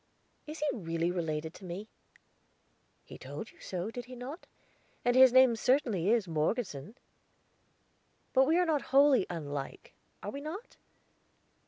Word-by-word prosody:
"Is 305 +1 -6
he 300 - -2
really 165 -4 -1
related 160 -2 -3
to - - -14
me?" 185 +4 -6 1.2
"He - - -12
told - - -7
you 340 - -24
so, 185 +3 -4
did 245 +1 -7
he 255 0 -10
not? 265 +8 -8 0.6
And 245 0 +3
his 260 -1 +8
name 260 -2 +6
certainly 225 - +1
is 225 -4 +2
Morgeson." 160 - -2 1.4
"But 265 0 +5
we 320 +3 +3
are 325 -4 +2
wholly 275 -6 +4
unlike, 145 -5 -6 0.3
are - - -4
we 280 - -6
not?" 355 +11 -7
235 Hz, 140 wpm, -31 LUFS, 175-270 Hz, 1.4 s, his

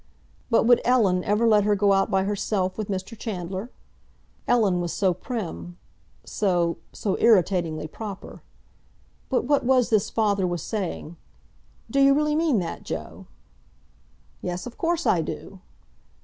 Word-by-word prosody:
But 230 - +4
would 240 0 +5
Ellen 205 -8 +3
ever 210 +3 +2
let 210 -2 +5
her 210 0 +2
go 200 0 +3
out 195 +2 +2
by 190 -2 +2
herself 195 -2 -1
with 215 -2 -4
Mr. 190 +3 -4
Chandler? 195 0 -5 0.8
Ellen 205 -7 +3
was 175 -1 -3
so 190 -3 +1
prim, 180 -3 -6 0.5
so—so 180 +1 -1
irritatingly 180 -7 +2
proper. 200 +4 -8 0.9
But 260 - +1
what 285 +1 +2
was 250 -1 +2
this 215 -3 +2
father 200 -4 +1
was 175 -3 -3
saying? 180 -5 -4 0.7
"D'you 275 +1 +5
really 300 0 +1
mean 315 -6 +2
that, 175 -4 -3
Joe?" 80 -1 -7 1.1
"Yes, 180 0 -4
of 245 - -8
course 340 0 -1
I 170 - +3
do!" 190 +4 -7
200 Hz, 135 wpm, -25 LUFS, 180-235 Hz, 1.1 s, would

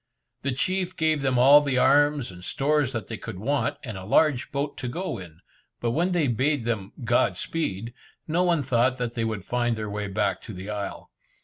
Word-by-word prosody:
The 140 - -1
chief 185 +7 -1
gave 155 -2 +2
them 130 -2 +1
all 140 +4 +8
the 140 -3 0
arms 145 -1 +3
and 90 -1 -12
stores 145 +4 +1
that 110 -6 -4
they 115 - -6
could 95 - -7
want, 135 +9 0
and 110 -6 -6
a - - -9
large 130 +6 +2
boat 140 +1 -2
to 130 - -4
go 175 - -3
in, 85 -2 -12 0.4
but 115 - 0
when 170 +8 +1
they 175 -4 +2
bade 130 +2 +1
them 105 -5 -2
"God 120 +1 +2
speed," 115 - -3 0.3
no 165 +3 +1
one 170 -5 +2
thought 125 0 +2
that 120 -2 -3
they 115 - -2
would 110 -4 -3
find 120 0 0
their 105 -1 -4
way 105 0 -3
back 100 0 -1
to 110 - -9
the 95 +3 -6
isle. 100 -2 -5
125 Hz, 210 wpm, -26 LUFS, 110-145 Hz, 0.4 s, all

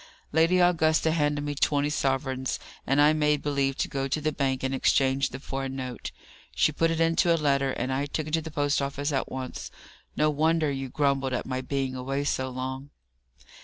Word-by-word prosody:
Lady 165 +4 +4
Augusta 160 -2 +3
handed 145 -2 0
me 145 0 -2
twenty 145 0 +1
sovereigns, 135 -2 -1 0.3
and 135 +2 +2
I 150 +1 +6
made 150 -1 +1
believe 140 -2 0
to - - 0
go 135 -2 -2
to 135 - -1
the 155 +1 0
bank 135 -2 -1
and 130 0 -1
exchange 135 0 +2
them 130 - -8
for 135 0 -4
a - - -3
note. 130 -2 -5 0.5
She - - +3
put 165 +3 +1
it 165 0 -1
into 165 +1 +3
a 165 - +4
letter, 140 -3 +1
and 130 +2 -2
I 140 +2 -1
took 155 +1 -3
it 155 - -7
to 165 - +2
the 160 - -7
post 145 -2 0
office 140 +2 -2
at 135 - -1
once. 130 -1 -5 0.5
No 150 0 +3
wonder 155 0 +2
you 135 -1 -4
grumbled 135 -1 0
at 125 - -2
my 130 0 -3
being 135 0 -2
away 135 +2 -2
so 130 -2 -1
long!" 130 +2 -5
140 Hz, 205 wpm, -27 LUFS, 135-150 Hz, 0.5 s, I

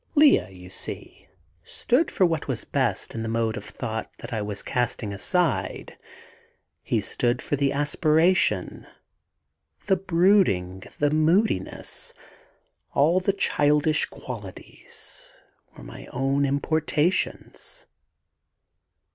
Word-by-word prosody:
Lea, 290 - +5
you 90 -1 -12
see, - - -7 0.4
stood 255 - +1
for 190 - +3
what 165 -2 -1
was 130 -5 -3
best - - -1
in 115 - -4
the 110 - -3
mode 115 -1 0
of 100 - -6
thought 110 -1 -5
that 130 - -8
I 110 - -1
was 105 -1 -4
casting 120 -4 -2
aside. 175 - -1 0.9
He - - 0
stood 120 0 0
for - - -2
the 140 -1 +1
aspiration. 155 +5 +2 1.0
The 190 -2 +3
brooding, 170 - +2 0.2
the 145 0 +2
moodiness; 155 - 0 0.8
all 160 +6 +4
the 185 +2 +1
childish 150 -5 +2
qualities, - - -8 0.5
were - - -11
my - - -10
own 135 +2 0
importations. 155 - -1
145 Hz, 110 wpm, -25 LUFS, 115-175 Hz, 1.0 s, Lea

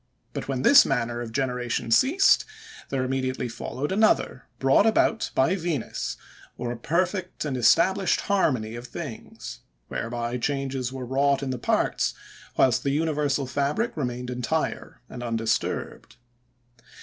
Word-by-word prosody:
But - - -5
when 135 -1 -2
this 285 0 +8
manner 120 -2 -1
of 115 -2 -6
generation 125 -2 -2
ceased, 300 - +5 0.5
there 135 -2 -1
immediately 130 -1 -1
followed 120 +5 -4
another, 205 - +2
brought 135 - +4
about 225 0 +2
by 135 +7 +3
Venus, 165 - -3 0.4
or 120 - -3
a - - -3
perfect 180 - -1
and 140 -3 -2
established 170 - +3
harmony 130 - +1
of 120 +1 -7
things; 125 - -8 0.3
whereby 120 +1 -3
changes 135 -1 -2
were 130 -1 -6
wrought 140 +2 +1
in 135 - -2
the 125 - -4
parts, - - 0 0.4
whilst 130 -3 +4
the 140 - -1
universal 145 -2 0
fabric 145 - -1
remained 125 -4 -3
entire 125 +6 -3
and 125 - -8
undisturbed. 115 -2 -2
135 Hz, 135 wpm, -25 LUFS, 120-155 Hz, 0.5 s, this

